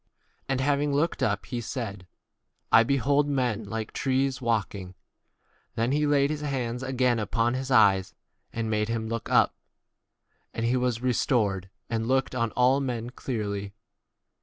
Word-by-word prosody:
And 135 -1 0
having 145 +1 +1
looked 150 +4 0
up, 100 -2 0
he 120 -1 -4
said, 105 -6 -5 0.6
I - - +8
behold 140 +4 +2
men 125 -6 0
like 110 -1 -4
trees 135 0 0
25 - - -15
walking. 100 -5 -1 0.8
Then 115 +3 0
he 150 +1 +2
laid 145 0 +3
his 150 -1 -3
hands 125 -4 -2
again 130 -2 +1
upon 115 +2 0
his 130 +1 -3
eyes, 100 -7 +4 0.4
and 115 -1 -3
made 105 0 0
him 115 -1 -2
look 115 -1 -4
up. - - +5
w - - -52 1.0
And 115 - -1
he 120 +2 +2
was 125 -2 0
re 125 -1 +2
stored 100 -7 0 0.2
and 115 -1 -2
looked 130 +1 +1
on 115 -3 0
all 125 +2 +4
men 120 -4 -3
26 - - -18
clearly. 100 -5 -3
120 Hz, 165 wpm, -27 LUFS, 110-135 Hz, 1.0 s, I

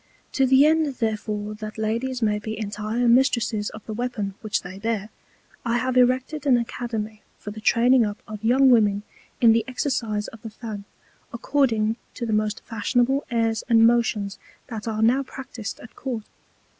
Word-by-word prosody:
To 265 -1 +2
the 265 +2 +6
end 310 -3 +2
therefore 215 -2 -2
that 215 0 -8
Ladies 230 +3 -1
may 210 -1 +2
be 220 +1 -5
entire 215 +3 -2
Mistresses 235 -4 +3
of 215 - -11
the 220 - -5
Weapon 215 -4 -3
which 215 -1 -1
they 185 +2 -8
bear, 220 -1 -2 0.5
I 235 0 +1
have 255 +1 -1
erected 260 +4 +2
an 255 -3 +6
Academy 225 -2 -4 0.2
for 205 - -7
the 215 +1 -9
training 240 +3 +4
up 205 -1 -2
of 215 0 -8
young 260 +3 +5
Women 205 -4 +3 0.4
in 230 -2 +7
the 230 0 +2
Exercise 230 -5 -1
of 225 - -14
the 225 - -7
Fan, 215 -2 -7 0.5
according 230 -3 +1 0.2
to 240 - -3
the 220 - -1
most 215 0 0
fashionable 245 +4 +1
Airs 230 -2 0
and 225 -1 +6
Motions 225 -4 +1 0.3
that 225 -2 -6
are 220 -1 -1
now 250 +5 +4
practis'd 255 -5 -7
at 235 - -13
Court. 245 -5 -4
225 Hz, 170 wpm, -24 LUFS, 215-250 Hz, 0.5 s, in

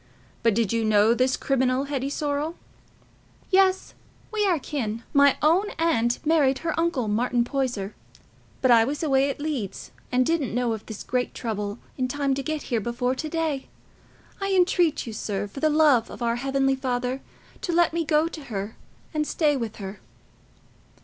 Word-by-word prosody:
But 230 -3 +3
did 230 -2 +1
you 230 -1 +1
know 215 +1 +4
this 255 +2 +1
criminal, 260 -1 +1
Hetty 275 -1 -2
Sorrel?" 295 +3 -2 1.0
"Yes, 380 0 +3 0.4
we 420 -2 +2
are 355 -3 +3
kin. 235 -6 -4
My 280 -1 +5
own 355 +7 +4
aunt 245 -8 +2
married 295 -4 +3
her 325 - +1
uncle, 330 -8 0
Martin 235 +3 +1
Poyser. 240 -6 -2 0.7
But 260 - +5
I 230 -1 +7
was 285 +7 -2
away 275 -2 +3
at 275 - -4
Leeds, 290 -10 -4 0.2
and 250 0 +3
didn't 300 -8 0
know 245 -2 +1
of 220 - -7
this 220 - -7
great 250 0 -2
trouble 210 -2 -3 0.2
in 255 - +1
time 280 +1 0
to 275 - -2
get 310 +1 -3
here 225 - +2
before 240 +3 -1
to 310 +4 -4
day. 315 -4 -2 0.7
I 390 0 0
entreat 355 -3 +2
you, 230 - -6
sir, 205 -2 -3
for 205 - -9
the 310 - +3
love 295 -6 +4
of - - -7
our 235 0 +1
heavenly 270 +1 +1
Father, 255 0 -2 0.4
to 350 - -2
let 340 -1 +3
me 335 0 0
go 305 +1 +2
to 315 -3 -8
her 205 -2 -5 0.4
and 305 -1 0
stay 300 -3 +2
with 230 -5 -3
her." 195 0 -7
270 Hz, 175 wpm, -25 LUFS, 235-310 Hz, 1.0 s, I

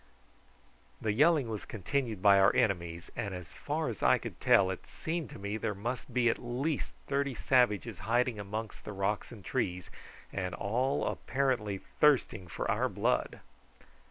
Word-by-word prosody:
The 110 - 0
yelling 150 +1 +4
was 110 -2 -4
continued 110 -1 -2
by 100 -1 +7
our 95 +1 +5
enemies, 85 -4 0
and 100 -3 -3
as 90 -3 -9
far - - -2
as - - -5
I - - +5
could - - -8
tell 95 -1 +5
it 95 - -7
seemed 160 -5 -4
to - - -9
me 100 +2 -3
that - - -12
there 105 - -1
must 120 +6 -4
be 120 0 +2
at 115 - +2
least 130 +5 -2
thirty 140 -1 0
savages 115 -5 +2
hiding 120 -1 +1
amongst 105 +2 -5
the 105 - -6
rocks 100 +3 -1
and 105 -5 -11
trees, 90 -2 -2 0.4
and 90 -1 -2
all 125 +7 0
apparently 125 -7 0 0.2
thirsting 135 -10 +3
for 85 - -4
our - - +1
blood. - - 0
110 Hz, 165 wpm, -31 LUFS, 100-130 Hz, 0.4 s, by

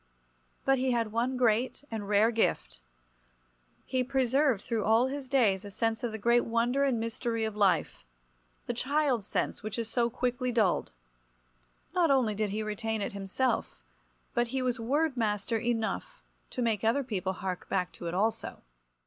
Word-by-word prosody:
But 270 -1 +3
he 255 -1 +1
had 230 -3 0
one 245 +3 0
great 245 +2 +1
and 210 -3 -4
rare 210 +3 +4
gift. 225 - 0 1.0
He 255 -1 0
preserved 265 -2 +2
through 225 -3 -1
all 225 +3 +4
his 270 0 -4
days 220 -8 +3
a 205 - -7
sense 225 +3 -1
of 240 - -1
the 220 - -4
great 235 +3 +3
wonder 235 +4 +1
and 260 -4 +2
mystery 230 0 -2
of 220 -1 -4
life—the - - -2
child 270 -2 +1
sense - - -2
which 215 +1 -5
is 230 -2 -2
so 235 -1 +2
quickly 250 +1 -1
dulled. 215 - +1 1.0
Not 355 -3 +3
only 255 -6 +3
did 210 0 -1
he 215 +2 -2
retain 220 +1 -2
it - - -4
himself, 200 +6 -2 0.5
but 240 -1 +1
he 260 +2 -2
was 250 -2 0
word 285 +5 +1
master 215 0 0
enough 240 - -2 0.3
to 250 - -2
make 225 -3 0
other 230 +6 +2
people 195 -6 -2
hark 185 -1 -5
back 180 -2 0
to 170 - -7
it 170 - -3
also. 215 +4 -1
230 Hz, 165 wpm, -30 LUFS, 210-255 Hz, 1.0 s, rare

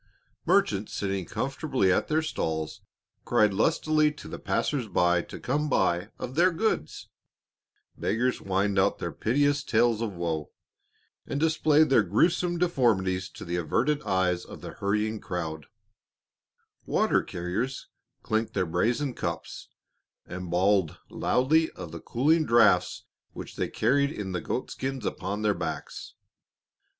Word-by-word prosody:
Merchants 100 +2 +2
sitting 95 -2 -2
comfortably 135 - 0
at - - 0
their 155 +1 +1
stalls 80 - -3 0.4
cried 105 -2 +3
lustily 155 +6 +2
to 150 - -11
the - - -7
passers 135 -6 -1
by 90 -2 +2
to - - -10
come 150 +4 -1
buy 90 -7 +1
of 125 - -6
their 175 +6 +4
goods; 180 - -2 0.9
beggars 125 +3 0
whined 95 +1 0
out 100 +1 +2
their - - -4
piteous 145 +4 +1
tales 115 -2 +2
of 110 -4 -2
woe, 80 -3 -3 0.8
and 140 - -2
displayed 155 -1 +3
their 120 - +6
gruesome 175 - +1
deformities 100 - +1
to - - -10
the 85 0 -2
averted 125 - 0
eyes 95 -5 0
of - - -11
the - - -7
hurrying 105 +2 -1
crowd; 80 -6 -5 1.2
water - - +2
carriers 100 +10 -4 0.4
clinked 110 0 -1
their 90 - +1
brazen 120 - 0
cups - - -5 0.6
and 90 -1 -7
bawled 95 -1 +2
loudly 160 +6 +2
of 80 - -8
the 85 -1 -8
cooling 155 +7 +2
draughts 120 -5 +3 0.3
which - - -8
they - - -2
carried 140 +5 +2
in 100 -9 -5
the 90 -2 -2
goat 125 - -3
skins 135 -1 -4
upon 100 +3 -3
their 105 -1 +3
backs. - - -6
110 Hz, 140 wpm, -27 LUFS, 95-145 Hz, 1.2 s, their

